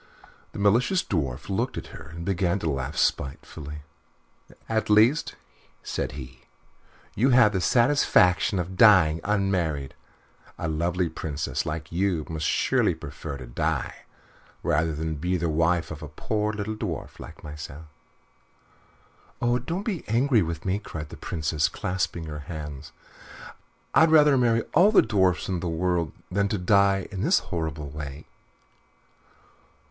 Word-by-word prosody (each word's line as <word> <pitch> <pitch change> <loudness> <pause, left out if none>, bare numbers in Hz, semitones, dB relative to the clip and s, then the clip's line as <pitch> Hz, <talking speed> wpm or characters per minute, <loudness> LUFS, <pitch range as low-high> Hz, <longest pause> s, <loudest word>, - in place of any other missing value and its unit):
The - - -8
malicious 115 - +3
Dwarf 70 -9 -3
looked 115 +6 -2
at - - -7
her - - -10
and 85 +1 -8
began 95 -1 +1
to 85 -5 -2
laugh 70 +2 -4
spitefully. 75 +2 -2 0.8
"At 110 -1 -1
least," 110 +8 +4 0.5
said 65 -2 -3
he, 65 -3 -10 0.7
"you 125 +7 +2
have 120 -4 +6
the 95 - 0
satisfaction 115 -7 +3
of 90 +1 -3
dying 90 -8 +6
unmarried. 90 -9 0 0.6
A 85 - -3
lovely 85 +3 0
Princess 80 -2 -3
like 75 0 -5
you 85 -3 0
must 80 -2 -2
surely - - +2
prefer 70 - -7
to 65 - -9
die - - -2 0.7
rather 80 +2 +1
than 80 0 -3
be 90 +5 0
the 85 -1 -1
wife 80 +1 +1
of 80 0 -7
a 80 - -6
poor 105 +8 -2
little 105 0 -4
dwarf 100 -8 -5
like - - -11
myself." 75 +1 -8 1.5
"Oh, 120 +1 +1
don't 170 - -4
be 200 -7 -3
angry 120 +1 +3
with 85 -1 -4
me," 95 +2 0
cried 80 -7 -7
the - - -9
Princess, 75 -1 -1
clasping 90 -2 -2
her 75 -1 -6
hands. 75 -2 -7 1.0
"I'd 160 - +6
rather 150 -3 +6
marry 115 -3 +2
all 195 +5 +6
the 215 - +6
dwarfs 95 -6 +1
in 95 -2 -1
the 85 - -3
world 85 0 0 0.2
than 100 +2 +1 0.2
die 100 -1 +3
in 95 -2 -4
this - - +4 0.2
horrible 80 -4 -3
way." 75 0 -7
90 Hz, 140 wpm, -26 LUFS, 75-105 Hz, 1.5 s, have